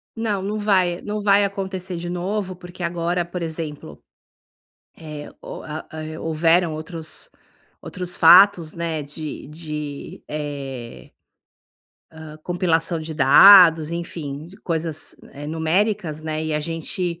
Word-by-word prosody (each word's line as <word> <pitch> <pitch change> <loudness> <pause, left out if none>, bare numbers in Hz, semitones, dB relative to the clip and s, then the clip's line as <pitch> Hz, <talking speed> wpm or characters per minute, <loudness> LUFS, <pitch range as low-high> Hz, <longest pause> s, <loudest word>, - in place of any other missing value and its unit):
Não, 215 -4 -1
não 210 +3 -3
vai, 185 -4 +2
não 210 0 -4
vai 200 0 +4
acontecer 190 -2 -4
de 175 +1 -5
novo 185 +2 -3
porque 175 0 -10
agora 170 +1 -1
por 175 +1 -6
exemplo, 155 - -6 1.0
eh, 150 -2 -8
o - - -8
a 155 0 -7 0.3
ho - - -8
houveram 165 +1 +2
outros 160 0 -5 0.5
outros 180 -1 -5
fatos, 175 -1 +7
né, 165 -2 -3
de 150 +1 -7
de, 150 -2 -7
eh, 140 -5 -6 1.0
hã, 160 -1 -11
compilação 170 -1 0
de 160 0 -6
dados, 165 +2 +8
enfim, 160 -4 -5
de 190 - -15
coisas, 160 -2 -3 0.2
eh, 145 +1 -8
numéricas, 160 +1 0
né, 155 0 -3
e 155 - -2
a 150 - +1
gente 170 +2 -4
165 Hz, 130 wpm, -22 LUFS, 155-180 Hz, 1.0 s, dados